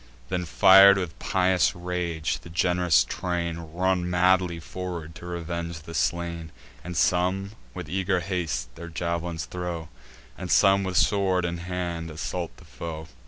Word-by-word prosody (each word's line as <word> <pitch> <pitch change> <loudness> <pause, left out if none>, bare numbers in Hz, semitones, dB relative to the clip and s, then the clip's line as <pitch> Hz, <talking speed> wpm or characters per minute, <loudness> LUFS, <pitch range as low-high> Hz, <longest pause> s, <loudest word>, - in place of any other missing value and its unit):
Then, 90 -1 -1
fir'd 95 +4 +7
with 90 -4 -4
pious 95 -1 +2
rage, 85 -3 -2
the - - -13
gen'rous 90 -4 +3
train 85 +4 -3
Run 90 +1 0
madly 90 -1 +2
forward 85 -1 -6
to 85 - -10
revenge 85 -1 -4
the 85 - -9
slain. 85 -1 -2 0.3
And 90 -1 -5
some 95 +1 +1 0.2
with 90 -4 -6
eager 95 +2 0
haste 85 -9 -3
their 85 +5 -9
jav'lins 85 -2 -3
throw; 85 +1 -5 0.5
And - - -5
some 100 0 +5
with 95 -1 -2
sword 95 -3 +2
in 85 0 -3
hand 85 -2 -4
assault 80 +2 -5
the - - -16
foe. 80 -1 -7
85 Hz, 145 wpm, -26 LUFS, 85-90 Hz, 0.5 s, fir'd